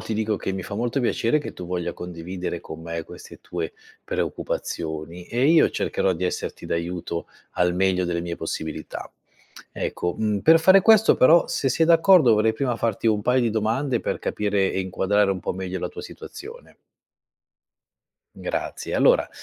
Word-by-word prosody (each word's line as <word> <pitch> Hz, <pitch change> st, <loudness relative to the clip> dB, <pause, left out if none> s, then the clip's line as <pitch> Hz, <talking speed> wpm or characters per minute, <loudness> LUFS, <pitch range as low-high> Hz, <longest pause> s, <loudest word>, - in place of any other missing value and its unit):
ti 110 Hz, -, -4 dB
dico 110 Hz, 0 st, 0 dB
che 95 Hz, -, -3 dB
mi 95 Hz, -1 st, -4 dB
fa 100 Hz, -, -7 dB
molto 120 Hz, +5 st, -1 dB
piacere 120 Hz, +2 st, +1 dB
che 145 Hz, -, -7 dB
tu 90 Hz, -, -8 dB
voglia 90 Hz, -1 st, -3 dB
condividere 90 Hz, 0 st, -6 dB
con 80 Hz, -1 st, -9 dB
me 85 Hz, 0 st, -5 dB
queste -, -, -12 dB
tue 85 Hz, -2 st, -5 dB, 0.3 s
preoccupazioni, 80 Hz, +2 st, -4 dB
e 125 Hz, +3 st, +1 dB
io 165 Hz, -1 st, +6 dB
cercherò 95 Hz, -, 0 dB
di 90 Hz, +2 st, -3 dB
esserti 90 Hz, -, -4 dB
d'aiuto 85 Hz, 0 st, -3 dB, 0.3 s
al 90 Hz, 0 st, +1 dB
meglio 90 Hz, 0 st, +1 dB
delle 85 Hz, -1 st, -1 dB
mie 85 Hz, 0 st, -5 dB
possibilità. 80 Hz, -1 st, -5 dB, 0.6 s
Ecco, 90 Hz, 0 st, -3 dB
mhmm, 105 Hz, -2 st, 0 dB
per 160 Hz, +6 st, +6 dB
fare 190 Hz, +4 st, +7 dB
questo 220 Hz, +1 st, +6 dB
però 165 Hz, +7 st, +6 dB
se 170 Hz, -5 st, 0 dB
sei 160 Hz, +5 st, +2 dB
d'accordo 165 Hz, -, +6 dB
vorrei 110 Hz, +1 st, +2 dB
prima 120 Hz, +1 st, -1 dB
farti 115 Hz, -1 st, -1 dB
un 105 Hz, -2 st, +2 dB
paio 125 Hz, +3 st, +2 dB
di 120 Hz, -2 st, +1 dB
domande 115 Hz, +4 st, 0 dB
per -, -, -2 dB
capire 100 Hz, -2 st, 0 dB
e -, -, -1 dB
inquadrare 95 Hz, +2 st, +1 dB
un 95 Hz, -1 st, -2 dB
po' -, -, -3 dB
meglio 95 Hz, 0 st, -4 dB
la -, -, -2 dB
tua -, -, -9 dB
situazione. 470 Hz, +3 st, -11 dB, 1.6 s
Grazie, -, -, -4 dB
allora -, -, +4 dB
100 Hz, 170 wpm, -24 LUFS, 90-125 Hz, 1.6 s, fare